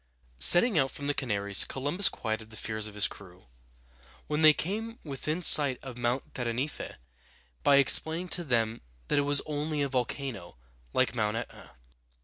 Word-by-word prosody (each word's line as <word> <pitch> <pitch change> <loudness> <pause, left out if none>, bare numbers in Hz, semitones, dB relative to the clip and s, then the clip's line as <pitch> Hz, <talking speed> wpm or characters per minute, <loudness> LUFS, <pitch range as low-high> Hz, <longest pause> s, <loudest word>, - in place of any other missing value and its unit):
Setting 175 - +6
out 135 -1 0
from 140 - -9
the 145 - -1
Canaries, 100 -7 0
Columbus 145 +9 +1
quieted 110 0 -6
the 110 - -13
fears 110 0 -4
of 105 - -12
his 105 - +3
crew, 90 -5 -16 0.8
when 150 +1 -3
they 155 -1 +7
came 220 +9 -5
within 155 +4 -5
sight 140 -5 +7
of 130 -2 -9
Mount 120 +2 -3
Tenerife, 125 +4 -5 0.7
by 140 - +3
explaining 160 +5 +4
to 175 - 0
them 115 -5 -1 0.3
that - - +1
it 145 0 -2
was 145 -1 0
only 150 0 -3
a 140 - -3
volcano, 125 - -5 0.3
like 130 - 0
Mount 110 -2 -2
Et´na. 115 - -10
135 Hz, 160 wpm, -28 LUFS, 115-150 Hz, 0.8 s, they